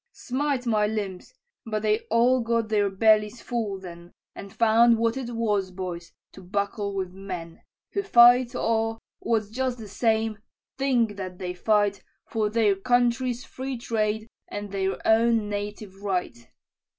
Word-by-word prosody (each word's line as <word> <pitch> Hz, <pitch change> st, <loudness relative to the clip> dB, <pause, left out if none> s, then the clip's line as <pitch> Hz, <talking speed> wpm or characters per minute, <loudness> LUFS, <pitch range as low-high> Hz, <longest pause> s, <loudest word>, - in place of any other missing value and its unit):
"Smite 265 Hz, 0 st, -2 dB
my 215 Hz, -3 st, +2 dB
limbs! 205 Hz, -4 st, -4 dB, 0.3 s
but 215 Hz, -1 st, -3 dB
they 215 Hz, 0 st, +2 dB
all 245 Hz, +3 st, +4 dB
got 230 Hz, -1 st, 0 dB
their 205 Hz, -2 st, +2 dB
bellies 215 Hz, +3 st, +3 dB
full 220 Hz, -6 st, -3 dB
then, 175 Hz, -1 st, -11 dB, 0.2 s
And 200 Hz, -, -10 dB
found 230 Hz, +1 st, +4 dB
what 230 Hz, +1 st, +1 dB
it 260 Hz, -3 st, -4 dB
was, 210 Hz, -4 st, 0 dB
boys, 180 Hz, -2 st, -6 dB, 0.2 s
to 190 Hz, -, -13 dB
buckle 200 Hz, +2 st, -2 dB
with 185 Hz, -2 st, -3 dB
men, 180 Hz, -4 st, -7 dB, 0.3 s
Who 400 Hz, -, 0 dB
fight, 245 Hz, -8 st, +6 dB
or, 225 Hz, -1 st, 0 dB, 0.2 s
what's 215 Hz, -3 st, -1 dB
just 255 Hz, +1 st, -1 dB
the 220 Hz, -2 st, -9 dB
same, 220 Hz, +1 st, 0 dB, 0.4 s
think 245 Hz, -6 st, +1 dB
that 185 Hz, -2 st, -6 dB
they 180 Hz, -1 st, -4 dB
fight 205 Hz, +2 st, +1 dB, 0.2 s
For 215 Hz, -2 st, -1 dB
their 215 Hz, -2 st, +2 dB
country's 245 Hz, +3 st, +1 dB
free 260 Hz, 0 st, -5 dB
trade 220 Hz, -2 st, -1 dB, 0.2 s
and 205 Hz, -1 st, -6 dB
their 195 Hz, -1 st, -1 dB
own 225 Hz, -1 st, +3 dB
native 205 Hz, -1 st, -6 dB
right. 180 Hz, -12 st, -3 dB
215 Hz, 150 wpm, -26 LUFS, 200-235 Hz, 0.4 s, fight